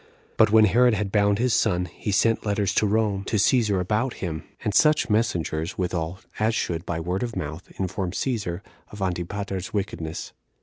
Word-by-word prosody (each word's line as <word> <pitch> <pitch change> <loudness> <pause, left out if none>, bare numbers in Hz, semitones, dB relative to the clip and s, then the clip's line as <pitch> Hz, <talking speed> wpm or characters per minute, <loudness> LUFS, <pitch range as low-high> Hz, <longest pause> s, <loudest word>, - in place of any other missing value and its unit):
But 110 -2 +4
when 110 0 +7
Herod 120 +3 +4
had 100 -1 -2
bound 100 -1 +3
his 125 +1 +1
son, 90 -5 +2
he 90 +4 -5
sent 115 +3 +2
letters 100 -2 0
to 105 - +2
Rome 105 -2 +1
to 110 - -2
Cæsar 105 -1 +3
about 110 +7 0
him, 80 -2 -4 0.2
and 105 -3 -1
such 150 -2 +4
messengers 85 -7 0
withal 90 0 -2 0.2
as 110 +1 +2
should, 85 -4 -2
by 85 -1 -2
word 90 +3 -2
of 120 -2 -3
mouth, 80 +3 -5
inform 95 0 -2
Cæsar 95 -3 -2 0.3
of 105 - -10
Antipater's 95 +1 -3
wickedness. 85 -6 -4
100 Hz, 175 wpm, -25 LUFS, 90-110 Hz, 0.3 s, when